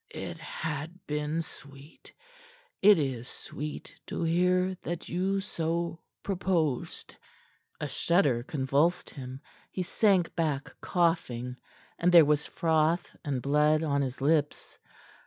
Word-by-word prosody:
"It - - -5
had 160 +3 -5
been 150 +2 -1
sweet. 140 -1 -14 0.7
It 205 0 +8
is 130 -5 -2
sweet 150 +3 -7
to - - -3
hear 180 +2 +2
that 175 -1 -5
you 195 +3 0
so 170 -3 -2 0.2
proposed." 175 -8 -1 0.6
A - - -2
shudder 145 -9 +2
convulsed 145 +6 0
him. 130 -1 -8 0.3
He 185 - -3
sank 185 -1 +2
back 150 -4 -1
coughing, 130 -9 0 0.4
and 175 +1 +3
there 170 -3 +9
was 150 0 +2
froth 165 0 +1
and 135 -5 -2
blood 150 +2 +3
on 140 -2 +1
his 130 -1 -3
lips. 150 +1 0
160 Hz, 120 wpm, -29 LUFS, 140-175 Hz, 0.7 s, there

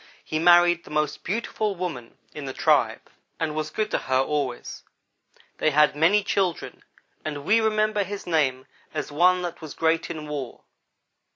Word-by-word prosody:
He 155 - -2
married 175 0 +5
the - - -14
most 150 -1 -1
beautiful 215 0 -2
woman 160 -10 -6 0.2
in 150 -2 -7
the 130 - -5
tribe - - +2 0.4
and 160 -2 -1
was 155 0 -3
good 215 +6 -2
to - - +1
her 130 0 0
always. 135 -2 -2 0.8
They 155 - +3
had 150 0 +4
many 180 +7 +4
children, 190 -4 -1 0.4
and 145 -2 -5
we 225 +2 +4
remember 215 -1 +1
his 200 +1 -7
name 135 -6 +1 0.3
as - - -3
one 180 +4 +3
that 175 -1 -5
was 155 -2 -8
great 165 0 +1
in 155 -3 -6
war. 140 -5 -6
160 Hz, 165 wpm, -25 LUFS, 150-185 Hz, 0.8 s, married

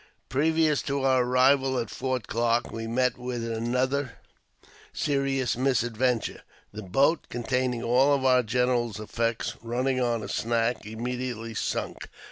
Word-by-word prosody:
Previous 155 +2 +2
to 140 -1 -2
our 130 -2 +4
arrival 130 +1 +3
at 115 -3 -3
Fort 130 -3 -2
Clarke 115 +1 0
we 115 0 -5
met 125 +2 0
with 125 -1 -4
another 125 +4 -1 0.8
serious 135 -3 0
misadventure. 125 -1 0 0.3
The 110 - -6
boat 135 - +2
containing 125 0 -1
all 135 +3 +3
our 130 -1 +5
general's 120 -2 0
effects, 115 +1 -2
running 125 +3 -1
on 120 -3 0
a - - -5
snag, 115 -1 -1
immediately 120 0 -4
sunk. - - -3
125 Hz, 125 wpm, -27 LUFS, 115-130 Hz, 0.8 s, our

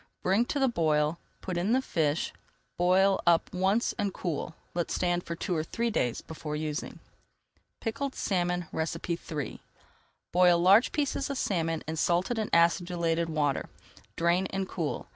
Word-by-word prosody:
Bring 195 +6 +3
to 285 - -2
the 270 -1 +3
boil, 155 -6 +1 0.2
put 185 -2 -3
in 200 +6 +1
the 260 - +4
fish, 155 - 0 0.4
boil 190 +2 +3
up 170 -1 +3
once 190 +5 +1
and 205 -1 0
cool. 165 -3 -4 0.2
Let 175 -1 -1
stand 175 -1 0
for 170 - -3
two 175 +1 -2
or 155 - 0
three 235 +8 -2
days 125 - 0
before 155 -1 -6
using. 150 0 -4 0.8
PICKLED 265 +4 -3
SALMON 180 -2 0
III 160 -4 -3 0.7
Boil 180 -1 +5
large 195 +7 +6
pieces 285 -2 -1
of 280 - -2
salmon 165 -7 -1
in 160 +1 -3
salted 180 +8 +1
and 215 - -2
acidulated 170 -1 +2
water, 145 -3 0 0.5
drain, 175 +3 +2
and 195 -1 -3
cool. 165 -6 -3
175 Hz, 150 wpm, -29 LUFS, 165-195 Hz, 0.8 s, large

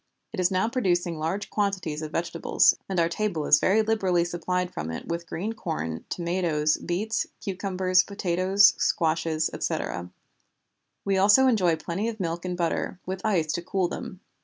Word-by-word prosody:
It 215 - -5
is 180 -1 +3
now 190 +2 +1
producing 175 - 0
large 190 +6 -3
quantities 190 -7 -1
of 155 -1 -5
vegetables, 170 0 +2
and 190 -2 0
our 165 - +3
table 170 -4 -2
is 145 - +6
very 215 +7 +3
liberally 190 -6 +1
supplied 180 +1 -2
from 80 +1 -4
it 80 - -6
with 170 0 -4
green 205 +8 -3
corn, 155 - -4
tomatoes, 170 -4 0
beets, 210 +6 -2
cucumbers, 185 -1 +1
potatoes, 190 0 +3
squashes, 160 -1 +1
etc. 85 +1 -3 1.0
We 195 -1 +1
also 205 +7 +6
enjoy 190 -10 +3
plenty 170 +7 -3
of 220 -1 -7
milk 170 -1 -3
and 180 -1 -3
butter, 175 +1 -2
with 190 0 -5
ice 175 -8 +1
to - - -2
cool 185 +1 0
them. 185 +2 -7
180 Hz, 160 wpm, -26 LUFS, 165-195 Hz, 1.0 s, is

